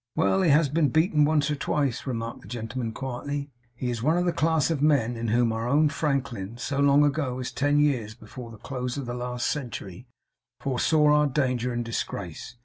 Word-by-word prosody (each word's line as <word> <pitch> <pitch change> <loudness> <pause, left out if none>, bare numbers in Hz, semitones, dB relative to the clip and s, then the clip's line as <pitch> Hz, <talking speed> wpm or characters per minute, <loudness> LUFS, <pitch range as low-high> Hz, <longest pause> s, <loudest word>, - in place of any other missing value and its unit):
'Well! 165 +4 +2
He 180 - +3
has 150 +2 +5
been 150 +1 +2
beaten 155 -2 +3
once 150 -1 +2
or - - 0
twice,' 140 -2 -1
remarked 115 -2 -4
the - - -14
gentleman 115 +1 -4
quietly. 140 +4 -5 0.2
'He 125 0 -2
is 115 -2 -4
one 155 +7 +2
of 175 - +1
a 175 - +1
class 160 -1 +2
of 150 -4 -1
men, 135 -6 +3
in 115 0 -3
whom 115 +1 +2
our 115 +1 -2
own 150 +3 +4
Franklin, 135 -8 -2
so 140 +3 -3
long 140 +1 +5
ago 140 -3 0
as 130 -1 -4
ten 145 +1 +1
years 125 -8 +1
before 120 0 -10
the 115 - -11
close 125 +3 -4
of 140 - -4
the 120 - -4
last 125 0 -3
century, 120 -6 -4 0.5
foresaw 150 +4 +2
our 150 0 +4
danger 125 -3 0
and 120 0 -2
disgrace. 100 -3 -5
135 Hz, 205 wpm, -26 LUFS, 120-150 Hz, 0.5 s, has